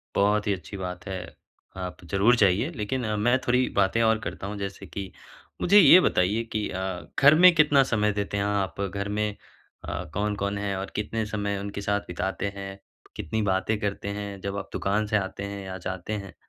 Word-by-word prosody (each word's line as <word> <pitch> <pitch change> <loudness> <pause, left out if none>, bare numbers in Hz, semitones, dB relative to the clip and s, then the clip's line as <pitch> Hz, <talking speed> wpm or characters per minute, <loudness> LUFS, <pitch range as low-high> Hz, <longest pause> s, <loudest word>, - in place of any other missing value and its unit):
बहुत 105 +1 +2
ही 105 - +2
अच्छी 95 +2 -9
बात 90 -1 -6
है, 95 -1 -3 0.6
आप 90 -1 -6
ज़रूर 105 +5 +4
जाइए। 105 - +3
लेक़िन 120 +4 -2 0.2
मैं 120 +4 +3
थोड़ी 125 +1 +3
बातें 100 +3 +3
और 110 -1 +3
करता - - -5
हूँ 105 +1 -5
जैसे 100 0 -6
कि 95 +2 -7 0.5
मुझे 200 +4 +6
ये 180 -1 +9
बताइए 100 - +2
कि 105 -1 -1
अ, 95 -1 -4
घर 145 +2 +8
में 180 +2 +7
कितना 150 -3 +5
समय 105 -1 +2
देते 100 0 -3
हैं 100 - 0
आप? 100 -1 -1
घर 100 +1 -3
में 105 0 -1 0.5
अ, 90 - -4
कौन-कौन 100 0 -1
है? 100 -1 -2
और 95 - -5
कितने 110 +1 -2
समय 100 -1 -2
उनके 100 0 -5
साथ 100 0 0
बिताते 95 +3 -3
हैं, 95 0 -7 0.4
कितनी 110 +7 -2
बातें 100 +2 0
करते 100 -1 -3
हैं 100 -1 -6
जब 100 +1 -4
आप 100 - -5
दुकान 105 +2 0
से 105 0 +1
आते 100 -1 -3
हैं 100 -1 -6
या 95 0 -5
जाते 95 +2 -5
हैं? 100 -5 -5
100 Hz, 195 wpm, -26 LUFS, 95-110 Hz, 0.6 s, ये